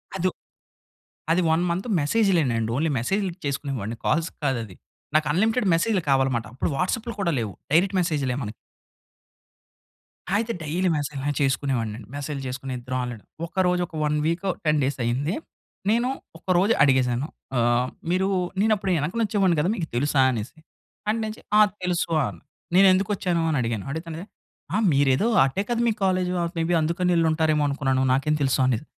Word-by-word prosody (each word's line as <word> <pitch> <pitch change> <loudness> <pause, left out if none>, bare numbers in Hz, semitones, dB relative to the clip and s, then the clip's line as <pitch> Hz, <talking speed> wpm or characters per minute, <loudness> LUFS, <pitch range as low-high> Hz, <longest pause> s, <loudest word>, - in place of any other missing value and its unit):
అదు 185 -1 +1 1.0
అది 175 +3 +3
1 160 +2 +3
మంత్ 185 +7 -2
మెసేజ్‌లే 190 +3 +3 0.2
అండి. 115 0 -1
ఓన్లీ 160 +3 +1
మెసేజ్‌లు 190 - -1
చేసుకునే 140 0 -2
వాడిని 110 +4 -4
కాల్స్ 165 +1 +1
కాదది. 115 -9 -2 0.4
నాకు 155 -1 +3
అన్లిమిటెడ్ 220 +7 +2
మెసేజ్‌లు 185 +3 +1
కావాలి‌మాట 135 -4 +2
అప్పుడు 130 - -1
వాట్సాప్‌లు 225 - -1
కూడా 170 -4 +1
లేవు 110 -3 -3 0.2
డైరెక్ట్ 185 +4 +3
మెసేజ్‌లే 145 -7 0
మనక్ 105 -2 -5 1.8
అయితే 225 +2 0
డైలీ 170 +4 0
మెసేజ్‌లా 145 -1 -3
చేసుకునేవాడినండి. 120 -6 -1
మెసేజ్‌లు 145 -1 -4
చేసుకునే 130 +1 -5
ఇద్దరం 125 +1 -4
ఆల్రెడి, 120 -4 -6 0.2
ఒక 170 - -14
రోజు 180 0 +1
ఒక 165 - -12
1 150 0 +1
వీకు, 175 +4 0 0.2
10 150 -1 +3
డేస్ 135 0 -1
అయింది 140 - 0 0.5
నేను 235 +3 +2 0.3
ఒక 165 - -27
రోజు 200 +6 +4
అడిగేసాను, 130 -1 +2 0.3
ఆహ్, 120 +1 +2 0.2
మీరు 185 +1 +2 0.3
"నేను 220 +1 +3
అప్పుడు 195 -2 -2
ఎనక 150 +4 -2
వచ్చేవాడిని 195 -5 +2
కదా! 160 +5 +1
మీకు 170 -7 -3
తెలుసా?" 140 +2 +2
అనేసి. 120 +6 -5 0.5
అంటేనెంచి 220 0 -2 0.2
"ఆ! - - +7 0.2
తెలుసు" 180 -1 0
అన్ 100 -9 -4 0.4
"నేనేందుకొచ్చాను" 185 -2 +3
అని 155 - +1
అడిగాను, 115 -4 -2
అడిగితే‌ 160 +3 -5
అనాది 165 +4 -6 0.5
"ఆ! - - +3 0.2
మీరేదో 140 - +3 0.2
ఆటే 135 +9 0
కదా! 240 -1 0
మీ 225 - +3
కాలేజు 185 -1 +1 0.2
మే 165 - +1
బీ - - +4
అందుకనేళ్ళుంటారేమో 160 -2 +2
అనుకున్నాను 135 -2 0
నాకేం 140 +3 +1
తెలుసు?" 135 -1 +2
అనాది. 130 0 0
155 Hz, 155 wpm, -24 LUFS, 130-185 Hz, 1.8 s, ఆ